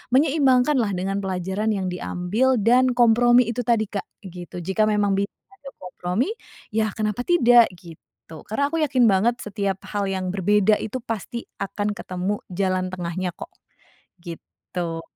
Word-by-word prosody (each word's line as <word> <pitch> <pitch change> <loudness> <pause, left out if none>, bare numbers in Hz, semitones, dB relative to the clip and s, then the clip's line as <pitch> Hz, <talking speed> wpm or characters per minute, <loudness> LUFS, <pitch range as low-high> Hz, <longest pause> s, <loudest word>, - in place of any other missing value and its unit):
menyeimbangkan, 275 -1 +3
lah, 205 -5 0
dengan 195 +2 -2
pelajaran 190 +2 -3
yang 190 -2 -2
diambil 190 +8 0
dan 245 +3 +3
kompromi 240 +1 +5
itu 240 - -5
tadi, 225 -3 0
Kak, 200 - -4 0.2
gitu. 175 -1 -8
Jika 195 +4 +1
memang 205 -2 +1
bisa 200 - -1 0.2
ada 290 -9 -12
kompromi, 180 - -2 0.4
ya, 215 -1 -1
kenapa 215 +2 -2
tidak, 245 -9 +6
gitu, 170 -3 -13 0.5
karena 280 +7 0
aku 330 - -1
yakin 260 -4 +2
banget 225 +6 +2
setiap 200 -2 -3
hal 205 -1 -1
yang 185 -1 -2
berbeda 205 +2 +3
itu 255 +4 -4
pasti 230 0 -5 0.2
akan 205 +1 -2
ketemu 190 0 -3
jalan 185 0 -1
tengahnya, 180 -1 -4
kok, - - -9 0.7
gitu. 170 -1 -6
205 Hz, 145 wpm, -23 LUFS, 185-240 Hz, 0.7 s, tidak